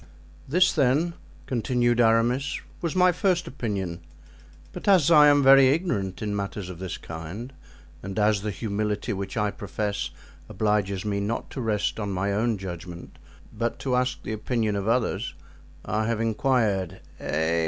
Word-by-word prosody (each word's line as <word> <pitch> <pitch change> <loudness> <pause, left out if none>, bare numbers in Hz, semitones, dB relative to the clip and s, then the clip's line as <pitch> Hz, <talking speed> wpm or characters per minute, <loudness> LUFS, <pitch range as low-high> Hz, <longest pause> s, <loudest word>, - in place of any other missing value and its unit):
"This, 180 +5 +4
then," 150 +4 +2 0.3
continued 120 -1 +1
Aramis, 120 +5 +2 0.2
"was 170 -1 -2
my 180 0 +5
first 180 -1 +1
opinion; 100 -9 -3 0.7
but - - -8
as 180 -6 +5
I 150 -2 +8
am 145 -1 +5
very 135 0 +8
ignorant 110 - -1
in 105 -1 -2
matters 100 -2 -4
of 85 - -10
this 95 -1 -5
kind 85 +11 -7 0.5
and 95 0 -6
as 105 -1 +3
the 105 - -3
humility 105 0 -2
which 100 +4 -5
I 105 -1 +1
profess 100 -3 -3 0.4
obliges 105 -3 0
me 100 -1 -1
not 105 +3 -3
to 135 - -4
rest 110 -1 -1
on 105 -2 -2
my 100 +2 -1
own 110 +2 +1
judgment, 90 -2 -8 0.4
but 115 0 -2
to 130 -2 0
ask 125 +1 0
the 110 - -4
opinion 110 -1 -1
of 100 0 -2
others, 115 +1 0 0.5
I 110 0 -1
have 115 -1 0
inquired—Eh! 95 - 0
110 Hz, 155 wpm, -26 LUFS, 100-130 Hz, 0.7 s, I